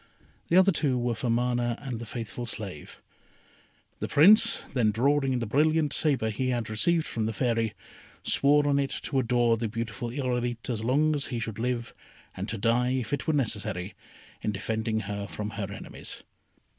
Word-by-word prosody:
The 170 Hz, -, +3 dB
other 190 Hz, +1 st, +6 dB
two 145 Hz, -6 st, +1 dB
were 120 Hz, 0 st, 0 dB
for 115 Hz, +2 st, -3 dB
Mana 120 Hz, 0 st, +1 dB
and 130 Hz, -5 st, -5 dB
the 120 Hz, -, -7 dB
faithful 120 Hz, +1 st, -5 dB
slave. 100 Hz, -9 st, -5 dB, 1.0 s
The -, -, -2 dB
Prince 215 Hz, +9 st, +6 dB
then 120 Hz, -5 st, +3 dB
drawing 135 Hz, +4 st, +2 dB
the 120 Hz, -, -2 dB
brilliant 150 Hz, +5 st, +2 dB
sabre 135 Hz, -8 st, +2 dB
he 130 Hz, +4 st, -1 dB
had 120 Hz, -3 st, -2 dB
received 160 Hz, +9 st, +2 dB
from 110 Hz, -2 st, -2 dB
the 110 Hz, -, -2 dB
Fairy, 115 Hz, -2 st, 0 dB, 0.5 s
swore 145 Hz, +1 st, +4 dB
on 140 Hz, -1 st, +3 dB
it 140 Hz, -1 st, 0 dB
to 135 Hz, -, 0 dB
adore 120 Hz, -2 st, +2 dB
the 115 Hz, 0 st, -2 dB
beautiful 115 Hz, +1 st, -4 dB
Irolite 125 Hz, -2 st, -2 dB
as 110 Hz, -2 st, -3 dB
long 145 Hz, +6 st, +2 dB
as 145 Hz, -2 st, -2 dB
he 125 Hz, -, -3 dB
should 110 Hz, -1 st, -4 dB
live, 120 Hz, 0 st, -2 dB, 0.4 s
and 95 Hz, +4 st, -5 dB
to 110 Hz, -, -3 dB
die, 120 Hz, +4 st, +2 dB
if 130 Hz, -1 st, -2 dB
it 145 Hz, -, -2 dB
were 160 Hz, -, +2 dB
necessary, 105 Hz, -8 st, -2 dB, 0.5 s
in 105 Hz, -, -1 dB
defending 110 Hz, +2 st, -2 dB
her 100 Hz, 0 st, -4 dB
from 105 Hz, 0 st, -5 dB
her 100 Hz, -3 st, -4 dB
enemies. -, -, -7 dB
120 Hz, 180 wpm, -27 LUFS, 110-135 Hz, 1.0 s, other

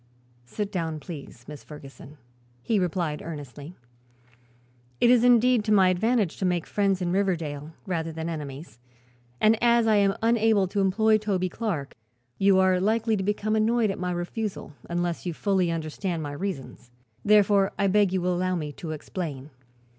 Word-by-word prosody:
"Sit 205 Hz, -, -4 dB
down, 165 Hz, -4 st, -3 dB
please, 140 Hz, -6 st, -10 dB
Miss 150 Hz, -1 st, -9 dB
Ferguson," 145 Hz, -1 st, -12 dB, 0.5 s
he 215 Hz, -, +1 dB
replied 170 Hz, -4 st, -2 dB
earnestly. 150 Hz, 0 st, -8 dB, 1.2 s
"It 240 Hz, -, +5 dB
is 245 Hz, -2 st, +5 dB
indeed 245 Hz, -1 st, +4 dB
to 215 Hz, -, 0 dB
my 190 Hz, -3 st, +5 dB
advantage 210 Hz, +1 st, +1 dB
to -, -, -5 dB
make 175 Hz, -2 st, 0 dB
friends 195 Hz, -2 st, 0 dB
in 175 Hz, -, -1 dB
Riverdale, 165 Hz, -6 st, -2 dB
rather 165 Hz, -3 st, -2 dB
than 160 Hz, +1 st, -5 dB
enemies, 145 Hz, -5 st, -7 dB, 0.6 s
and 215 Hz, 0 st, +3 dB
as 235 Hz, -1 st, +4 dB
I 215 Hz, -1 st, +4 dB
am 195 Hz, -1 st, +2 dB
unable 225 Hz, -4 st, +3 dB
to 200 Hz, +1 st, -1 dB
employ 215 Hz, +3 st, +3 dB
Toby 190 Hz, -4 st, -1 dB
Clark 175 Hz, -11 st, -4 dB, 0.5 s
you 195 Hz, -1 st, +4 dB
are 185 Hz, -1 st, +3 dB
likely 220 Hz, +2 st, +1 dB
to 195 Hz, -, -2 dB
become 210 Hz, +2 st, -1 dB
annoyed 220 Hz, 0 st, +2 dB
by -, -, -4 dB
my 180 Hz, 0 st, -2 dB
refusal, 175 Hz, -1 st, -4 dB, 0.2 s
unless 175 Hz, 0 st, -2 dB
you 170 Hz, -, -3 dB
fully 190 Hz, -2 st, +1 dB
understand 165 Hz, +1 st, -3 dB
my 145 Hz, -, -5 dB
reasons. 145 Hz, -7 st, -6 dB, 0.3 s
Therefore 205 Hz, -1 st, +4 dB
I 200 Hz, -, +1 dB
beg 200 Hz, 0 st, +3 dB
you 185 Hz, -1 st, 0 dB
will 180 Hz, +1 st, 0 dB
allow 185 Hz, +1 st, 0 dB
me 150 Hz, -4 st, -4 dB
to 155 Hz, +2 st, -6 dB
explain." 150 Hz, -3 st, -6 dB
185 Hz, 165 wpm, -26 LUFS, 160-210 Hz, 1.2 s, It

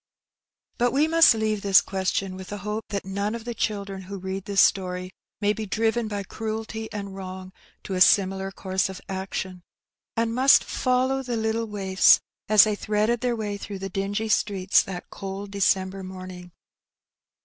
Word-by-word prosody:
But 245 Hz, 0 st, +2 dB
we 290 Hz, +3 st, +3 dB
must 330 Hz, -6 st, +6 dB
leave 215 Hz, -2 st, -1 dB
this 195 Hz, -1 st, +6 dB
question, 190 Hz, 0 st, -2 dB
with 190 Hz, 0 st, -9 dB
the 205 Hz, -, -5 dB
hope 210 Hz, +1 st, -3 dB
that 200 Hz, -2 st, -3 dB
none 200 Hz, +3 st, -2 dB
of 230 Hz, -1 st, -8 dB
the 240 Hz, -, -3 dB
children 200 Hz, -3 st, -3 dB
who 195 Hz, +2 st, -7 dB
read 190 Hz, 0 st, -5 dB
this 200 Hz, -1 st, 0 dB
story 185 Hz, -1 st, +1 dB, 0.3 s
may 205 Hz, 0 st, +2 dB
be 215 Hz, -1 st, -5 dB
driven 225 Hz, +3 st, 0 dB
by 205 Hz, -1 st, -3 dB
cruelty 220 Hz, +2 st, -5 dB
and 200 Hz, -2 st, -6 dB
wrong 185 Hz, -1 st, -8 dB, 0.3 s
to 195 Hz, -, -5 dB
a 185 Hz, -, -1 dB
similar 190 Hz, 0 st, +4 dB
course 190 Hz, 0 st, -1 dB
of 190 Hz, -, -7 dB
action, 190 Hz, -1 st, -5 dB, 0.6 s
and 230 Hz, 0 st, +1 dB
must 260 Hz, +3 st, +6 dB
follow 255 Hz, +1 st, 0 dB
the 245 Hz, -3 st, -3 dB
little 220 Hz, +1 st, -1 dB
waifs 195 Hz, -3 st, +4 dB, 0.3 s
as 215 Hz, -1 st, +8 dB
they 215 Hz, -, +1 dB
threaded 215 Hz, +3 st, 0 dB
their 245 Hz, -1 st, 0 dB
way 210 Hz, -2 st, -3 dB
through 200 Hz, 0 st, -7 dB
the 195 Hz, 0 st, -5 dB
dingy 200 Hz, +3 st, -2 dB
streets 195 Hz, -3 st, +2 dB
that 180 Hz, -2 st, -8 dB
cold 195 Hz, +1 st, -6 dB
December 195 Hz, -1 st, +1 dB
morning. 185 Hz, -1 st, -9 dB
200 Hz, 170 wpm, -25 LUFS, 190-220 Hz, 0.6 s, as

